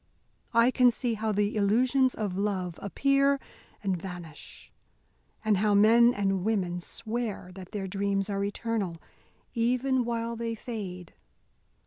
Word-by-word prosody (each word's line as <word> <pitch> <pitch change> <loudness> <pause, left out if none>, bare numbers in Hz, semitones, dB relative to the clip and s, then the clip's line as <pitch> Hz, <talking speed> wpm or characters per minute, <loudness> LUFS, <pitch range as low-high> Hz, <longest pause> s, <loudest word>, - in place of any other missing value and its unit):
I 230 +2 +6
can 250 -1 +5
see 240 0 -1
how 220 0 -1
the 205 +1 0
illusions 250 +6 +3
of 205 -4 -3
love 190 -4 -2
appear 275 +6 +2 0.4
and 195 -2 +1
vanish, 175 -3 -9 0.7
and 215 -2 +3
how 205 +1 +2
men 230 +4 +6
and 195 -4 0
women 185 -5 0
swear 220 -1 -4
that 185 -1 -10
their 205 -3 -3
dreams 195 0 -1
are 200 -1 -1
eternal, 200 -4 -2 0.5
even 255 +2 +1
while 235 0 -2
they 230 0 -3
fade. 195 -7 -7
210 Hz, 130 wpm, -28 LUFS, 195-235 Hz, 0.7 s, I